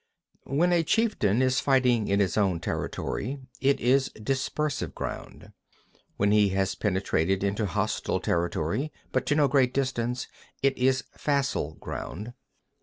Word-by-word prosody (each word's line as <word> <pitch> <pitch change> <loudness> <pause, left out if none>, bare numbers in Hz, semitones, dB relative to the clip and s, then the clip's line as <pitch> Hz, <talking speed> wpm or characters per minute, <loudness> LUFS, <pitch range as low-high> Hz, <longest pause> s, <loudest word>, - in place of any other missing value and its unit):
2. 135 - -4
When 175 +4 +3
a 170 - +4
chieftain 155 - +2
is 130 0 +2
fighting 125 -5 +3
in 100 +1 +2
his 95 -4 +1
own 95 -5 +2
territory, 125 +8 -3 0.2
it 140 +1 +2
is 130 +3 +3
dispersive 135 +5 -2
ground. - - -7 0.4
3. - - -32 0.2
When 100 +1 +2
he 105 -1 +5
has 95 -1 +1
penetrated 95 -2 0
into 100 +2 0
hostile 85 - -1
territory, 85 - -1 0.2
but - - 0
to 145 - +2
no 150 -2 +4
great 130 -2 +2
distance, 125 -2 -1 0.4
it 135 -1 +3
is 130 +1 +2
facile 140 - -1
ground. 105 +6 -6
125 Hz, 145 wpm, -27 LUFS, 100-135 Hz, 0.4 s, he